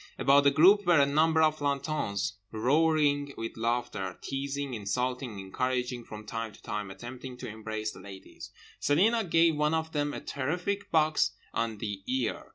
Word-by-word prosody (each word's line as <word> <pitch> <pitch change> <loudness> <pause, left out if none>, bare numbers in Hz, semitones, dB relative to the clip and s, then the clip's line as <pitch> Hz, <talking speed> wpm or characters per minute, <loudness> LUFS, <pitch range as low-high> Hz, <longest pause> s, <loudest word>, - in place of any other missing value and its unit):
About 140 +1 +4
the - - +8
group 185 +7 +5
were 175 -4 +6
a 140 - +6
number 160 +3 +3
of 155 0 +3
plantons, 140 -8 -1 0.2
roaring 145 +3 +2
with 115 0 -5
laughter, 115 -5 -2
teasing, 140 0 -4
insulting, 125 +2 -2
encouraging, 125 +4 -2
from 105 0 -9
time 115 -1 -4
to - - -17
time 105 -2 -4
attempting 125 +5 -8
to - - -7
embrace 110 0 -4
the - - -12
ladies. 95 -1 -11 0.3
Celina 220 +10 +3
gave 165 -3 +3
one 150 +1 +1
of 160 0 -2
them 145 -1 -1
a - - -5
terrific 180 +9 -3
box 155 -1 +2 0.2
on 115 -2 -1
the 100 -2 -5
ear. 125 -3 -1
135 Hz, 165 wpm, -29 LUFS, 115-155 Hz, 0.3 s, the